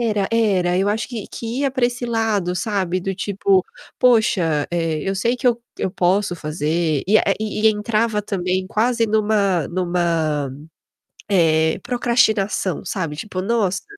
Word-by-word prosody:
Era, 210 -4 0
era. 190 -6 +2
Eu 195 +1 +1
acho 215 +2 -1
que 230 -5 -6
que 235 +3 -5
ia 275 - +1
pra 260 -2 +1
esse 245 0 -5
lado, 220 -6 0
sabe, 185 -3 -1
do 195 +2 -3
tipo, 195 -1 +1 0.3
"Poxa, 190 - +3
eh, 165 -3 -1
eu 195 - -1
sei 230 +5 +1
que 255 - -14
eu 235 -1 0 0.2
eu 190 - -2
posso 185 +1 +1
fazer". 155 0 -1
E, 215 +3 +5
eh, - - +1
e 215 0 0
entrava 215 0 0
também 185 -2 -1
quase 230 +1 +1
numa 205 -5 +1
numa, 170 -5 0 0.8
eh, 160 -4 +3
procrastinação, 220 - +1
sabe, 165 -5 -3
tipo: 185 +3 -5
"Nossa, 195 -2 0
195 Hz, 150 wpm, -20 LUFS, 175-220 Hz, 0.8 s, E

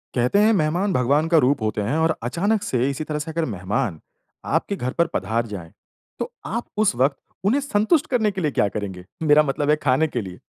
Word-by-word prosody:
कहते 125 +10 +2
हैं, 215 +2 +5
मेहमान 180 +2 +1
भगवान 140 +4 +2
का 165 0 +4
रूप 140 -2 +3
होतें 110 -1 -1
हैं 130 +10 0
और 160 0 +2
अचानक 200 - 0
से 130 -6 0
इसी 140 +2 -3
तरह 150 -1 -3
से 150 +2 -5
अगर 165 0 -1
मेहमान 95 - -2 0.5
आपके 200 - 0
घर 130 -8 -3
पर 170 -1 +2
पधार 115 +5 -1
जाएँ, 90 -6 -8 0.5
तो - - -3
आप 235 +3 -3
उस 215 - +2
वक़्त 135 +3 +2 0.3
उन्हें 255 +8 +3
संतुष्ट 275 +3 +2
करने 220 -5 +2
के 190 -1 -4
लिए 150 -3 0
क्या 105 - +2
करेंगे? 95 -3 -5 0.2
मेरा 150 0 +6
मतलब 145 0 -1
है 150 - +6
खाने 150 +1 +2
के 125 -5 -3
लिए? 95 -3 -9
150 Hz, 215 wpm, -22 LUFS, 120-180 Hz, 0.5 s, मेरा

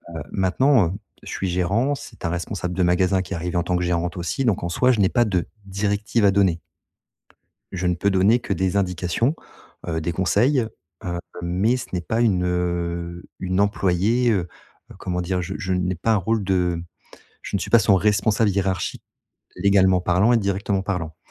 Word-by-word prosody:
Heu, 80 - -4
maintenant, 100 +3 +3
heu, 90 - -4 0.3
je - - -9
suis 95 - -3
gérant, 100 +10 +1
c'est 145 -5 -12
un - - +1
responsable 90 +1 -3
de 95 - +1
magasin 90 +2 +2
qui 95 - -7
est - - -2
arrivé 90 +2 -3
en 85 - +1
tant 90 +1 -1
que 90 - -1
gérante 85 0 -1
aussi, 90 +10 -2
donc 110 -7 +1
en 85 - -2
soi, 125 +9 +3
je 110 - -2
n'ai 95 - +4
pas 120 -1 +2
de 95 -5 0 0.2
directives 105 +3 -1
à 100 - +6
donner. 95 -4 +2 1.1
Je 90 0 -3
ne 90 - +2
peux 100 +4 +1
donner 100 +5 +4
que 105 - -3
des 95 +2 0
indications, 95 - 0 0.5
heu, 80 -1 -2
des 80 +2 -2
conseils, 105 - +2 0.4
heu, 85 -1 -3 0.2
mais 95 +8 +1
ce 125 - -7
n'est 90 - -1
pas 110 +7 -1
une, 95 -6 +2
heu, 85 -1 -2 0.2
une 95 0 -1
employée. 105 +4 +2
Heu, 90 -4 0 0.4
heu, - - -11
comment 90 -1 -3
dire? 90 +1 -1
Je 85 - -5
je 95 -3 -2
n'ai 90 0 0
pas 110 +7 +1
un - - +3
rôle 105 +2 0
de 90 -3 0 0.6
je - - -3
ne - - -3
suis - - -5
pas 115 - +7
son 100 -1 +4
responsable 105 +2 +2
hiérarchique, 95 -1 -2 0.5
légalement 95 -2 +3
parlant 90 +7 +3
et 120 - +5
directement 100 -1 -1
parlant. 90 -6 -3
95 Hz, 200 wpm, -22 LUFS, 90-105 Hz, 1.1 s, pas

